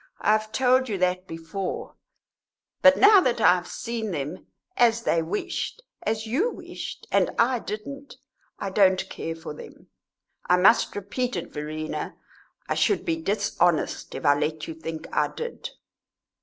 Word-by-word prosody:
I - - +2
have 215 0 +1
told 255 +1 +3
you 205 - -1
that 185 0 0
before; 165 +3 -5 0.9
but 275 0 +7
now 405 -2 +8
that 245 -7 +1
I 180 - +7
have 180 -1 -3
seen 230 -2 -4
them 155 +1 -5 0.3
as 230 -1 +3
they 165 - +2
wished, 210 - -3 0.2
as 220 +1 -2
you 280 - +1
wished, - - -8
and - - +3
I 245 +1 +3
didn't 275 +7 -7 0.4
I 195 - -4
don't 190 -1 +3
care 165 - -4
for 165 -2 -8
them; - - -13 0.6
I 180 - +6
must 180 +2 +4
repeat 225 +5 -2
it, 175 - -5
Verena. 155 +1 -4 0.5
I - - 0
should 410 - +1
be 325 -1 -1
dishonest 195 - 0
if - - -6
I 145 - +7
let 150 +1 -2
you 165 - -5
think 160 0 -6
I - - +3
did." 475 0 -6
200 Hz, 155 wpm, -25 LUFS, 165-240 Hz, 0.9 s, now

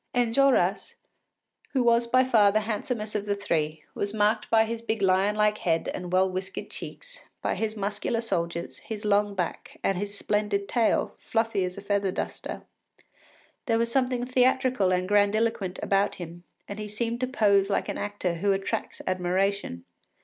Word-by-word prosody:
Enjolras, 245 +3 +2 0.8
who 260 -3 +2
was 235 0 +3
by 255 +2 +4
far 220 -6 +5
the 215 +1 +2
handsomest 215 0 -3
of 210 -1 -2
the 205 - +1
three, 160 -6 -1
was 205 +1 -3
marked 215 +1 +1
by 225 0 +5
his 230 +1 -4
big 225 -1 -2
lion 195 +2 +3
like 210 0 +2
head 165 -2 0
and 180 -1 -5
well 185 +1 +4
whiskered 185 0 -5
cheeks, - - -8 0.2
by - - +1
his 220 0 -2
muscular 205 +3 -1
shoulders, 170 -6 -3
his 215 -1 -7
long 205 0 +2
back, 180 -3 -4
and 195 -2 +1
his 205 0 -4
splendid 205 -1 0
tail, 230 0 +1
fluffy 225 -4 0
as 180 +1 -4
a - - -6
feather 200 -1 +1
duster. - - -5 1.0
There 225 -2 +3
was 230 0 0
something 250 -1 +1
theatrical 255 -5 +2
and 185 0 +1
grandiloquent 205 -1 +2
about 200 +1 +2
him, 175 -1 -9 0.2
and 200 +1 -6
he 210 - -4
seemed 230 +3 -2
to 255 - 0
pose 200 -6 +3
like 200 - 0
an - - -3
actor 205 -4 -2
who 200 +3 +2
attracts 195 0 -3
admiration. 185 - -1
205 Hz, 170 wpm, -27 LUFS, 195-230 Hz, 1.0 s, far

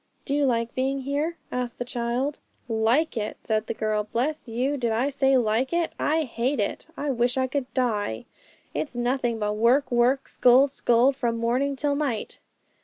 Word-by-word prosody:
'Do 280 - -2
you 290 0 +2
like 230 -2 0
being 270 +1 -1
here?' 290 +5 -2
asked 250 -1 -3
the 245 - -3
child. 245 +4 -2 0.3
'Like 230 +7 +1
it?' 215 -2 -3
said 215 -1 -1
the - - -2
girl. 215 -1 -1
'Bless 275 +5 -1
you! 250 +5 -1
did 240 -4 -1
you 245 +6 +1
say 270 -1 +3
like 235 +2 +1
it? 340 -1 0
I 320 +1 +2
hate 250 0 -1
it; 205 - -2
I 290 0 -1
wish 245 0 +1
I 260 - +2
could 265 0 -3
die. 210 - -1 0.5
It's 290 - -3
nothing 240 -1 0
but 210 -1 -1
work, 250 +6 +3
work, 245 +3 +2
scold, 260 +3 +5
scold, 250 +1 +3
from 235 -3 -1
morning 250 +5 0
till 285 +1 0
night.' 280 -7 -2
250 Hz, 180 wpm, -25 LUFS, 230-275 Hz, 0.5 s, scold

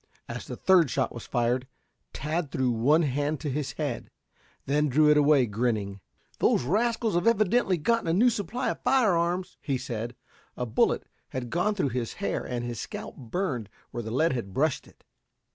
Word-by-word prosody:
As - - -6
the - - -5
third 180 -6 +4
shot 115 - 0
was 120 - -8
fired, 120 +2 0 0.4
Tad 155 - -2
threw 130 -2 +1
one 140 +9 +3
hand 145 +1 -1
to 150 - -2
his 145 0 -2
head; 145 -6 -3 0.6
then 150 +2 +2
drew 150 +3 +5
it - - +5
away 145 -3 +5
grinning. 105 -3 -1 0.4
"Those - - +3
rascals 225 - +1
have 175 +5 +1
evidently 215 -3 +3
gotten 230 +5 +1
a 165 - +2
new 235 +7 +5
supply 225 +4 -2
of - - -7
fire 250 -8 +3
arms," 175 +2 -1
he 135 -3 -1
said. 120 -2 -5 0.4
A 125 - -1
bullet 110 - +1 0.2
had 125 -2 -5
gone 180 +5 +1
through 180 -9 +1
his 120 -2 -3
hair 200 - -2
and 120 -1 -3
his 120 -3 -4
scalp - - -6
burned 125 - -3 0.2
where 120 - -4
the 110 - -6
lead 140 +6 +2
had 105 -7 -4
brushed 150 0 +1
it. - - -21
145 Hz, 185 wpm, -27 LUFS, 120-180 Hz, 0.6 s, drew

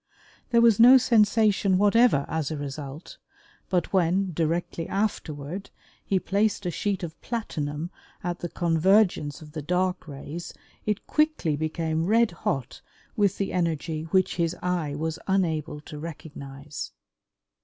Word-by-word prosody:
There 235 -1 +4
was 230 -3 +5
no 250 +3 +10
sensation 210 -5 +3
whatever 205 - +4
as 160 -3 -2
a 155 - -3
result, 145 +2 -7 0.5
but 180 -1 0
when, 185 +1 +2
directly 165 +1 -1
afterward, 180 -4 -3 0.3
he 195 - +1
placed 200 +2 0
a 175 - 0
sheet 195 +1 -2
of 165 -1 -7
platinum 160 -8 -3 0.3
at 175 0 -3
the 175 - -4
convergence 170 -3 +2
of 150 - -13
the 155 0 -5
dark 180 +3 -1
rays 150 +4 -7 0.3
it 210 -1 -1
quickly 305 - +1
became 160 +1 -1
red 230 +1 +4
hot 135 -6 -3 0.3
with 205 -3 +2
the 195 - -2
energy 160 -2 -1
which 185 +2 +1
his 170 0 0
eye 175 -5 -1
was 160 +2 -3
unable 160 -6 0
to 150 0 -9
recognize. 145 -3 -8
170 Hz, 135 wpm, -26 LUFS, 155-200 Hz, 0.5 s, no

